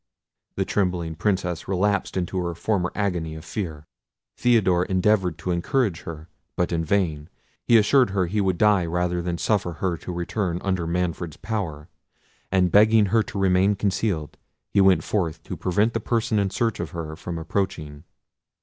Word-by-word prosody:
The 95 - 0
trembling 90 -4 -1
Princess 90 -1 -1
relapsed 100 +1 0
into 90 +1 -2
her 85 -1 -3
former 90 0 -1
agony 90 -6 -2
of 80 +1 -10
fear. 80 -7 -5 0.5
Theodore 95 -8 +3
endeavoured 95 -3 +1
to 90 - -3
encourage 90 +2 0
her, 80 -1 -8 0.3
but 90 - 0
in 85 -1 0
vain. 80 -4 0 0.4
He 120 - +7
assured 125 +2 +4
her 95 -2 +1
he 105 +5 -1
would 95 -2 +1
die 105 -2 +4
rather 90 +1 -1
than 85 0 -2
suffer 95 -3 0
her 85 +1 -2
to 90 - -7
return 90 +1 -2
under 95 -3 -1
Manfred's 85 -2 -2
power; 85 -9 -4 0.6
and 90 -2 +3
begging 110 +2 +6
her 115 - +5
to 105 - -6
remain 95 +1 +3
concealed, 95 -5 -1 0.4
he 100 - +5
went 95 -1 +5
forth 90 -7 -2
to - - -6
prevent 105 +6 +1
the 115 - 0
person 115 -1 0
in 100 -1 +1
search 115 +2 -1
of - - -3
her 80 -2 -5
from 85 0 -6
approaching. 80 -4 -3
90 Hz, 170 wpm, -24 LUFS, 85-100 Hz, 0.6 s, He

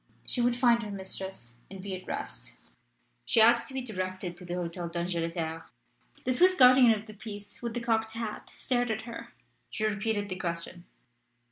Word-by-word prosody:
She 245 - +1
would 240 0 +3
find 240 -1 +4
her 215 - -5
mistress 190 - -5
and 195 - -8
be 190 0 -4
at 185 - -10
rest. - - -5 0.7
She 230 - +2
asked 235 +2 +6
to 270 - -10
be 260 - -2
directed 185 -5 -4
to 180 - -10
the 175 0 -3
Hotel 175 0 -3
d'Angleterre. 165 -1 -2 0.6
The 255 - +2
Swiss 365 +7 +6
guardian 255 -4 +8
of 210 - -12
the 215 - -10
peace 205 -1 -8
with 235 -1 -3
the 240 - -1
cocked 225 -1 +1
hat 225 -2 -5
stared 245 -2 -1
at 220 0 -2
her. 235 0 -8 0.4
She 215 - -4
repeated 210 0 0
the 185 -1 -5
question. 170 0 -4
205 Hz, 180 wpm, -29 LUFS, 180-235 Hz, 0.7 s, guardian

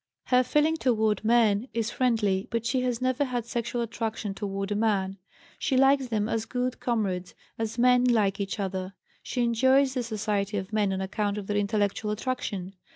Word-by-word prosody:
Her 250 0 +4
feeling 300 +5 +2
toward 220 -7 +1
men 225 -1 +3
is 230 0 -1
friendly, 220 -5 +1
but 230 -1 -2
she 250 +2 +1
has 250 -1 -1
never 255 +2 +1
had 245 -4 -2
sexual 235 0 -2
attraction 225 -3 -3
toward 195 0 -4
a - - +1
man. 200 -3 0 0.4
She 265 - +1
likes 270 0 +4
them 215 -3 0
as 225 -1 -1
good 250 +1 -2
comrades, 195 -7 -2 0.2
as 225 +1 -3
men 250 +1 +4
like 210 -5 +2
each 200 +1 -3
other. 190 -1 -3 0.3
She 245 - -2
enjoys 260 +3 +3
the 255 - -1
society 210 -3 -2
of 190 +2 -5
men 210 -2 +2
on 190 0 -2
account 205 +1 -2
of 205 - -5
their 205 - -2
intellectual 205 +1 0
attraction. 210 -4 -3
220 Hz, 180 wpm, -27 LUFS, 200-250 Hz, 0.4 s, Her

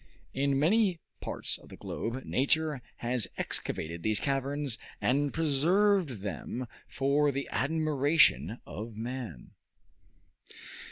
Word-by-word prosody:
In 140 0 +1
many 185 +4 +3 0.2
parts - - -1
of - - -16
the - - -11
globe, 120 +3 -4
nature 150 +1 +2 0.2
has 120 -1 +1
excavated 85 +1 -1
these 110 +3 +1
caverns, 140 -2 -1 0.2
and 140 +3 +2
preserved 165 - +2
them 105 +6 -4 0.2
for 145 +2 +2
the 140 0 -3
admiration 145 - +3
of 110 +1 -7
man. 115 - -6
135 Hz, 105 wpm, -30 LUFS, 120-150 Hz, 0.2 s, many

